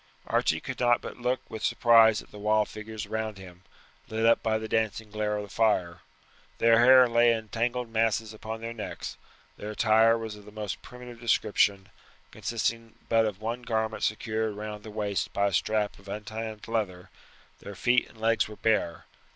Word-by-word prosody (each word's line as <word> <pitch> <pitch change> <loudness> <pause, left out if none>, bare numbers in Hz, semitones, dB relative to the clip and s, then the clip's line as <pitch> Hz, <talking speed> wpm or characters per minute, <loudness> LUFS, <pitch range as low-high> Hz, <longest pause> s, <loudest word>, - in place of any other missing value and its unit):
Archie - - +1
could - - -6
not 120 -1 +4
but - - -8
look 125 +1 -1
with 110 - -7
surprise 115 -2 +5
at - - -22
the 105 - -11
wild 105 +1 +2
figures 110 -1 -7
around 110 -1 -4
him, 90 -2 -12 0.5
lit 110 +1 -1
up 115 - +5
by 110 -1 +1
the 110 0 -5
dancing 110 -1 -1
glare 105 0 -1
of 105 - -4
the 100 - -10
fire. 90 -6 +1 0.6
Their 115 0 +5
hair 130 +1 +8
lay 120 0 +4
in 110 -2 -3
tangled 120 +1 -2
masses 110 -1 +1
on 110 +1 -7
their 115 0 -5
necks; 110 -3 -6 0.4
their 105 - -6
attire 110 +1 +4
was 110 -2 -6
of 105 -1 -14
the 105 - -12
most 105 -3 -5
primitive 125 -1 -11
description, 105 -4 +1 0.4
consisting 115 0 -3
but 115 -1 +4
of 105 -1 -6
one 120 +2 -3
garment 110 -2 -2
secured 110 0 -1
round 105 0 -6
the 110 - -9
waist 105 -3 -2
by 100 - +1
a - - -8
strap 105 +3 0
of 100 - -18
untanned 110 +1 -6
leather; 95 -5 -3 0.5
their 100 - -9
feet 120 +4 +2
and 115 - -18
legs 110 0 +2
were 105 - -10
bare. 105 -7 0
110 Hz, 185 wpm, -28 LUFS, 105-115 Hz, 0.6 s, hair